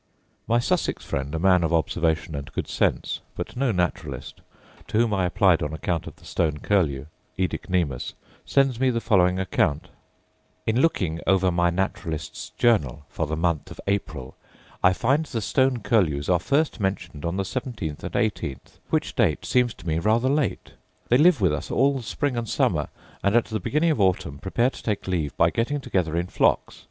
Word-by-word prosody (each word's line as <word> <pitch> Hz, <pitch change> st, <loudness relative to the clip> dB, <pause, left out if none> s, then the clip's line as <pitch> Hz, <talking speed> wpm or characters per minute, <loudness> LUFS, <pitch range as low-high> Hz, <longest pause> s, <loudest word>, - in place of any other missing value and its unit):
My 115 Hz, -, +3 dB
Sussex 120 Hz, -, 0 dB
friend, 70 Hz, +3 st, -3 dB
a -, -, 0 dB
man 90 Hz, 0 st, +4 dB
of 80 Hz, -, 0 dB
observation 80 Hz, -1 st, 0 dB
and 70 Hz, -1 st, -6 dB
good -, -, -3 dB
sense, -, -, 0 dB, 0.2 s
but -, -, -6 dB
no 130 Hz, 0 st, +1 dB
naturalist, 90 Hz, -3 st, -3 dB, 0.5 s
to 110 Hz, -, -1 dB
whom 115 Hz, -2 st, +3 dB
I 95 Hz, -2 st, +1 dB
applied 90 Hz, -2 st, +3 dB
on 75 Hz, +1 st, -2 dB
account 85 Hz, +1 st, -2 dB
of -, -, -9 dB
the -, -, -20 dB
stone 80 Hz, -3 st, 0 dB
curlew, 75 Hz, -7 st, +1 dB, 0.3 s
oedicnemus, 90 Hz, -7 st, -1 dB, 0.3 s
sends 135 Hz, -4 st, +2 dB
me 130 Hz, 0 st, +3 dB
the 115 Hz, -2 st, 0 dB
following 90 Hz, -5 st, +3 dB
account: 90 Hz, -5 st, 0 dB, 0.8 s
'In 115 Hz, +3 st, +2 dB
looking 90 Hz, -, +1 dB
over 95 Hz, -1 st, +3 dB
my 85 Hz, 0 st, +2 dB
Naturalist's 85 Hz, -4 st, -3 dB
Journal 75 Hz, -, +2 dB
for 80 Hz, -, -3 dB
the 80 Hz, +1 st, -2 dB
month 85 Hz, -2 st, 0 dB
of -, -, -11 dB
April, 80 Hz, -10 st, -3 dB, 0.5 s
I 90 Hz, -, +6 dB
find 135 Hz, -, +1 dB
the 120 Hz, -, -3 dB
stone 125 Hz, +5 st, +1 dB
curlews 80 Hz, -, +1 dB
are 90 Hz, -1 st, +4 dB
first 140 Hz, -, 0 dB
mentioned 90 Hz, -6 st, -3 dB
on 85 Hz, +2 st, -2 dB
the 100 Hz, -, -1 dB
seventeenth 110 Hz, -, -4 dB
and -, -, -5 dB
eighteenth, 110 Hz, -, -2 dB
which -, -, -1 dB
date -, -, +1 dB
seems 125 Hz, -3 st, +2 dB
to -, -, -12 dB
me 80 Hz, 0 st, +1 dB
rather 115 Hz, +7 st, +2 dB
late. 145 Hz, 0 st, -1 dB, 0.4 s
They 125 Hz, -, +5 dB
live 160 Hz, -, +5 dB
with 90 Hz, -5 st, +3 dB
us 75 Hz, -, -4 dB
all 140 Hz, +1 st, +3 dB
the -, -, -5 dB
spring 140 Hz, +3 st, -2 dB
and 115 Hz, -2 st, -3 dB
summer -, -, +1 dB, 0.4 s
and 100 Hz, +2 st, +2 dB
at 120 Hz, -, +4 dB
the 110 Hz, -, -3 dB
beginning 150 Hz, -, +1 dB
of 125 Hz, -, 0 dB
autumn 90 Hz, -7 st, +1 dB
prepare 120 Hz, +7 st, +1 dB
to -, -, -11 dB
take 105 Hz, -3 st, -2 dB
leave 80 Hz, -6 st, -2 dB
by -, -, +4 dB
getting 145 Hz, +6 st, -1 dB
together 85 Hz, -, -1 dB
in 85 Hz, -, 0 dB
flocks. -, -, +1 dB
95 Hz, 185 wpm, -25 LUFS, 80-120 Hz, 0.8 s, I